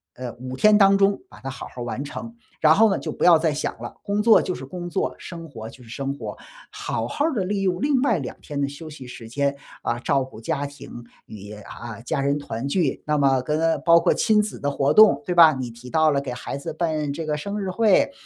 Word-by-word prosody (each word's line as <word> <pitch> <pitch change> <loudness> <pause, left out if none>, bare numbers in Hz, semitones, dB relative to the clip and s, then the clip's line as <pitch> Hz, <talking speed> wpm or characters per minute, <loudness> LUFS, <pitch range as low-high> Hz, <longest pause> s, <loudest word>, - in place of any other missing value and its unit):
呃， 125 -2 -6
5 130 +1 -7
天 210 +8 +5
当 195 -1 +6
中 200 0 +2
把 - - -15
它 135 - -5
好 135 - -7
好 125 - -9
儿 - - -2
完 125 +3 -4
成， 230 +10 -8 0.3
然 155 0 +6
后 220 +5 +5
呢， 195 - +1
就 - - -5
不 - - -5
要 175 -2 +8
再 160 -1 0
想 145 - -3
了。 - - -7
工 205 0 0
作 220 +1 +6
就 185 - -3
是 135 - -8
工 175 +5 -7
作， 190 - -1
生 165 -2 -8
活 110 -5 -8
就 125 - -15
是 115 - -16
生 135 +3 -3
活。 140 - -7 0.4
好 - - -3
好 290 - -2
儿 325 - 0
地 210 -7 0
利 195 +2 -2
用 185 -2 0
另 280 -3 +2
外 230 -7 +2
2 130 - -6
天 145 -1 -6
的 140 - +1
休 145 +3 -9
息 145 -4 -10
时 120 -2 -10
间， 140 +3 0 0.3
啊， 120 - -1
照 135 +1 +1
顾 130 -4 -11
家 145 +3 -2
庭 140 -4 -10 0.2
与 105 0 -10
啊， 115 +2 -9
家 140 +5 -2
人 140 +1 +1
团 130 -2 -5
聚。 150 -1 0
那 150 - +1
么 135 -2 +3
跟 160 +4 +1
包 170 0 +7
括 - - +2
亲 215 -1 +3
子 210 - -5
的 145 0 -1
活 140 0 +1
动， 215 +3 +7
对 180 -3 -2
吧？ 165 -2 +8
你 130 -3 -4
提 120 +2 -13
到 155 +3 +3
了 140 - +1
给 140 -2 -5
孩 125 +2 -5
子 155 +3 -6
办 155 -3 -1
这 165 - -5
个 150 -1 -1
生 200 +7 -4
日 190 - -3
会， 210 +5 +3
150 Hz, 270 characters per minute, -23 LUFS, 135-185 Hz, 0.4 s, 要